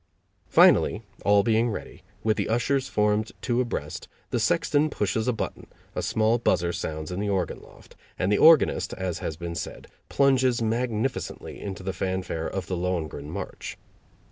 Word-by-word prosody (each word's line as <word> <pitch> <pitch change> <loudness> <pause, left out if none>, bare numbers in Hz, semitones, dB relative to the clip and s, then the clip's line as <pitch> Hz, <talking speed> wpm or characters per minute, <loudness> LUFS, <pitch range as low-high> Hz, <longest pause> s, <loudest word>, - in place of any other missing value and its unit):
Finally, 105 - +5 0.2
all 100 0 +5
being 115 +1 +2
ready, 110 - -6 0.2
with 110 -1 +2
the - - -2
ushers 130 +4 +1
formed 105 0 +1
two 120 0 0
abreast, 120 - -4 0.2
the - - +1
sexton 150 +2 +2
pushes 110 -1 -1
a - - +4
button, 115 - -5 0.3
a - - -2
small 110 +2 +2
buzzer 90 -6 +1
sounds 80 -1 -4
in 90 - -3
the 105 0 -1
organ 95 -4 -1
loft, - - -17 0.2
and 90 +3 0
the 105 - +4
organist, 155 - +5
as 90 -3 -3
has 80 - -4
been 85 0 -5
said, - - -6 0.2
plunges 130 -3 +3
magnificently 115 +2 -2
into 95 -1 -6
the 95 0 -2
fanfare 95 -2 -2
of 95 -2 -4
the 90 - -3
"Lohengrin" 85 -5 -3
march. - - -6
105 Hz, 165 wpm, -26 LUFS, 90-120 Hz, 0.3 s, Finally